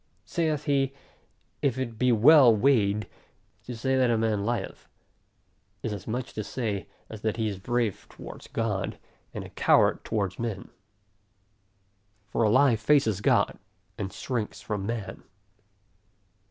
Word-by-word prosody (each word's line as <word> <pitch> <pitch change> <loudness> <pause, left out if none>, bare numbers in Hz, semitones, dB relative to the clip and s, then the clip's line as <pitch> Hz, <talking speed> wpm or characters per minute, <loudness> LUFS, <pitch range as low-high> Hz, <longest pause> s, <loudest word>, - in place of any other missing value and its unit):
Saith 155 -4 -1
he, 135 -2 +1 0.7
If 130 -3 +1
it 115 -4 -4
be 125 -1 +3
well 125 +1 +7
weighed, 105 -4 +2 0.6
to 125 - -6
say 130 +3 0
that 130 -2 +3
a 115 - +2
man 110 -2 0
lieth, 115 -2 -3 1.0
is 110 - -2
as 100 -3 -8
much 120 +3 -4
to 110 - -3
say, 105 -3 -3 0.2
as 110 -1 -9
that 110 0 -1
he 110 -1 0
is 100 -3 -4
brave 115 0 -1
towards - - -11
God, 105 -5 -2 0.3
and - - -6
a - - -10
coward - - +3
towards 100 -4 -2
men. 110 -5 -4 1.6
For - - -1
a 110 - +4
lie 120 +1 +5
faces 110 -4 +2
God, - - +2 0.4
and 95 -1 -4
shrinks 115 -2 -4
from 100 -2 -4
man. 115 -4 -4
115 Hz, 140 wpm, -27 LUFS, 105-130 Hz, 1.6 s, well